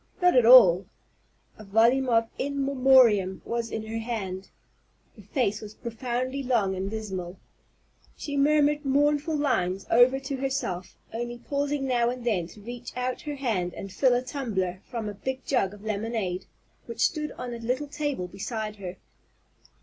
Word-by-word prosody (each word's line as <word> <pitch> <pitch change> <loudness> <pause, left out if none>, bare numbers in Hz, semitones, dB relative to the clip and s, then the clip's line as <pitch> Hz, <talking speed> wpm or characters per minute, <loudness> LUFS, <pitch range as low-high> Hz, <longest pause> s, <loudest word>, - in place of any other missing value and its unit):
Not 360 -4 +4
at 245 -3 +5
all! 195 -7 +8 0.7
A - - -9
volume 230 +6 +3
of 230 -1 +3
"In 280 0 -1
Memoriam" 255 -8 +4
was 235 0 -2
in 220 0 -4
her 225 +1 -4
hand. 200 -5 -4 0.7
Her 210 - -13
face 210 0 -1
was 215 0 -9
profoundly 250 +3 -3
long 235 -7 +1
and 190 +1 -3
dismal. 190 -4 -5 0.8
She 285 - -5
murmured 295 +1 +3
mournful 290 +3 +2
lines 195 -10 0
over 245 +3 +5
to 270 0 -4
herself, 265 -10 -3 0.2
only 240 +1 -4
pausing 280 +2 -2
now 240 -2 +2
and 245 -1 -5
then 190 -8 0
to 210 - -14
reach 240 +3 -8
out 250 0 -2
her 295 -1 -5
hand 210 -10 -2
and 195 - -7
fill 255 -3 +3
a 245 - 0
tumbler 200 -9 -3
from 230 -3 -4
a 210 - -4
big 260 +6 -5
jug 220 -9 +1
of 205 0 -13
lemonade 210 -3 -2 0.4
which 235 - -6
stood 305 -1 -1
on 245 -1 -6
a 235 - -6
little 250 +5 -2
table 290 -10 -3
beside 210 +3 -5
her. 185 -2 -7
235 Hz, 165 wpm, -27 LUFS, 205-270 Hz, 0.8 s, all